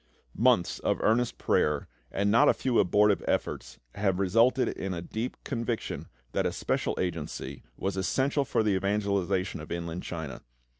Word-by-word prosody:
Months 115 -4 +3
of - - 0
earnest 120 +2 +2
prayer 75 -1 +1 0.2
and 100 +1 +1
not 140 +7 +6
a - - +4
few 130 -3 +1
abortive 105 +2 +4
efforts - - -2 0.2
had 95 -3 0
resulted 115 +7 +3
in 95 -1 -3
a 85 - -4
deep 110 +7 -4
conviction 115 -3 -3 0.2
that - - 0
a - - -1
special - - -1
agency 75 -6 -4 0.2
was 95 0 -2
essential 135 +9 +1
for 115 - +1
the 105 -2 +2
evangelisation 100 -1 0
of 75 - -10
Inland 85 0 -3
China. 80 -5 -6
100 Hz, 155 wpm, -29 LUFS, 90-115 Hz, 0.2 s, not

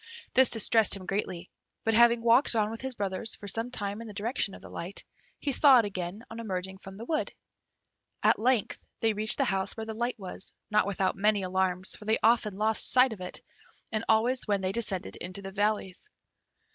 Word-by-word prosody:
This 260 0 +6
distressed 225 -1 +5
him 190 -2 -8
greatly; 185 -2 -4 0.3
but 225 - +1
having 235 +1 +5
walked 235 +2 +4
on 215 -1 +1
with 225 - -7
his 265 -1 -4
brothers 200 +2 -3
for 205 - -10
some 225 +5 0
time 205 -2 -5
in 230 - -8
the 210 - -10
direction 215 -1 -2
of - - -13
the - - -10
light, 180 +4 -7 0.3
he 285 - -2
saw 275 0 +7
it 230 - +3
again 190 +1 -5
on 225 - -7
emerging 190 -3 -4
from 195 0 -11
the 230 - -8
wood. 310 +3 -1 0.9
At - - +4
length 240 -2 +1 0.2
they 225 -1 +2
reached 215 +2 0
the 275 - +2
house 195 -2 -1
where 220 - -4
the 220 - -5
light 240 +3 -2
was, 190 -1 -7 0.2
not 210 -2 +3
without 195 -1 0
many 205 0 +1
alarms, 185 0 0
for 210 - -13
they 220 +1 +2
often 215 -3 +3
lost 220 +1 +3
sight 255 -1 +5
of 195 - -11
it, 180 - -7 0.5
and 215 0 -2
always 235 +4 +2
when 200 -2 +1
they 185 0 -1
descended 195 -4 -2
into 185 +3 -7
the 195 - -6
valleys. 205 - -1
215 Hz, 210 wpm, -28 LUFS, 195-230 Hz, 0.9 s, saw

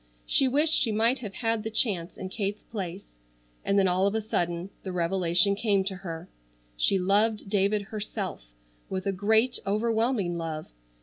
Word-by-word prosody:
She 270 - +4
wished 300 +5 +4
she 230 - +3
might 230 +5 +2
have 205 -5 -7
had 225 -2 0
the 220 - -4
chance 200 -6 0
in 190 - -6
Kate's 205 +1 -3
place, 190 -3 -6 0.5
and 200 - +1
then 195 -1 +4
all 185 +2 +2
of 200 - -1
a - - +2
sudden 175 -3 -2
the 190 - -5
revelation 175 +1 +2
came 200 -1 +1
to 190 -1 -3
her. 170 -2 -7 0.5
She 195 - +3
loved 205 +2 +1
David 205 0 +2
herself 200 - -6 0.3
with 190 0 -3
a 195 - +1
great 220 +6 +2
overwhelming 220 -3 0
love. 160 -2 -4
200 Hz, 170 wpm, -27 LUFS, 180-220 Hz, 0.5 s, She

